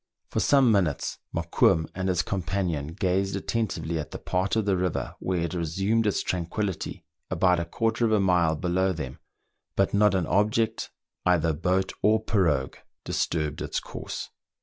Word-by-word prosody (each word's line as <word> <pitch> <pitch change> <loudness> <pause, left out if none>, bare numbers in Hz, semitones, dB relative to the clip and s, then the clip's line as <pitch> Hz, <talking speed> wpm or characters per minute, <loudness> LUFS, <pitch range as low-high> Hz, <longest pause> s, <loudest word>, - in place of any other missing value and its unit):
For - - 0
some 135 -4 +5
minutes 90 -9 0
Mokoum 80 -1 +2
and 95 0 -2
his 90 - +2
companion 90 -5 -2
gazed 95 +4 0
attentively 100 -6 -2
at 75 - -5
the - - -6
part 95 +3 -1
of 110 -2 +1
the 100 -2 +2
river 90 -2 -1
where 90 -2 -1
it 85 -1 -2
resumed 95 +7 0
its 100 - +1
tranquillity 90 +1 -3 0.2
about 90 -2 +3
a 85 - -2
quarter 115 +6 0
of 110 - +1
a 110 - +4
mile 90 -4 +3
below 90 +4 +1
them, 70 -5 -6 0.6
but 100 - +2
not 105 -1 +4
an 90 -3 +1
object, 110 +5 +1 0.3
either 85 -3 +3
boat 95 +4 0
or 110 +1 +4
pirogue, 85 -12 +1 0.3
disturbed 75 -2 -1
its - - -2
course. - - -6
95 Hz, 160 wpm, -26 LUFS, 85-100 Hz, 0.6 s, some